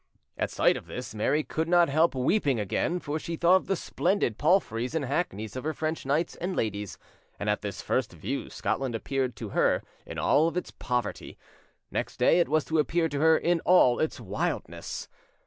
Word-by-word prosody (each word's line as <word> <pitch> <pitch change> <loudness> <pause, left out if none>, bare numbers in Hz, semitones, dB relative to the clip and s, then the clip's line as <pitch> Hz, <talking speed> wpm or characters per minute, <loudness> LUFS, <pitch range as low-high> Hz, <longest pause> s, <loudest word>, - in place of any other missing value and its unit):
At - - -1
sight - - +3
of - - -10
this, - - -6
Mary 135 +8 +1
could 160 +2 -2
not 175 -1 +5
help 155 +2 +2
weeping 135 - +1
again; 110 - -1
for 155 -1 -3
she 165 +1 -4
thought 175 +3 +5
of - - -6
the 195 - +1
splendid 175 - 0
palfreys 145 - +1
and 155 -4 0
hackneys 125 - -2
of 130 - -4
her 155 +1 -1
French 155 -3 -3
knights 155 +5 +1
and 180 +1 -3
ladies, 105 -2 -2 0.4
and 105 - -3
at 105 - -2
this 100 -2 -5
first 130 -4 0
view 100 - -4
Scotland 130 -4 -2
appeared 130 +2 -2
to 110 - -6
her - - +2 0.2
in - - -7
all 165 +4 +3
its 180 - -3
poverty. 125 -1 -3 0.5
Next - - -3
day - - +4
it 170 - +2
was 155 0 +2
to 160 0 0
appear 165 +2 +1
to 140 - -3
her 160 +1 +5
in 175 0 +1
all 160 -9 +5
its 155 - -1
wildness. - - -4
150 Hz, 195 wpm, -28 LUFS, 125-170 Hz, 0.5 s, not